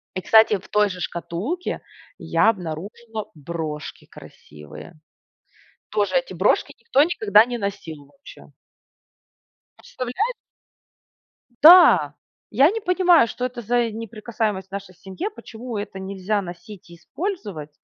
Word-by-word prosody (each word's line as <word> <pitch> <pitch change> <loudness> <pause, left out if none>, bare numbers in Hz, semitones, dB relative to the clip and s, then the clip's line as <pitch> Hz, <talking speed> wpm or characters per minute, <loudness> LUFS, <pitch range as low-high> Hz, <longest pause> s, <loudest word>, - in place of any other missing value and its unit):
и 185 - -2
кстати, 220 0 +5
в - - -17
той 210 -1 +2
же 180 - -7
шкатулке 175 - -4 0.4
я 225 - +2
обнаружила 210 +5 -7
брошки 155 -1 -6
красивые. 75 - -13 1.0
Тоже 210 +4 0
эти 260 -8 -1
брошки 185 +5 +1
никто 255 +4 +2
никогда 215 - +4
не 245 0 -5
носил 190 -8 -6
вообще. 280 - -16 1.3
Представляе 255 - -3 1.3
Да! 350 +3 +8 0.4
Я 275 - +4
не 450 - -4
понимаю, 360 - +4
что 250 - -5
это 245 -1 -7
за 240 +3 +1
и 225 - -4
неприкасаемость 215 -3 -4
в - - -58
нашей 200 -2 -7
семье. 195 - -6
Почему 240 - -8
это 205 -1 -6
нельзя 195 +2 -2
носить 175 +1 -11
и 170 - -12
использовать? 205 - -6
210 Hz, 125 wpm, -22 LUFS, 185-245 Hz, 1.3 s, Да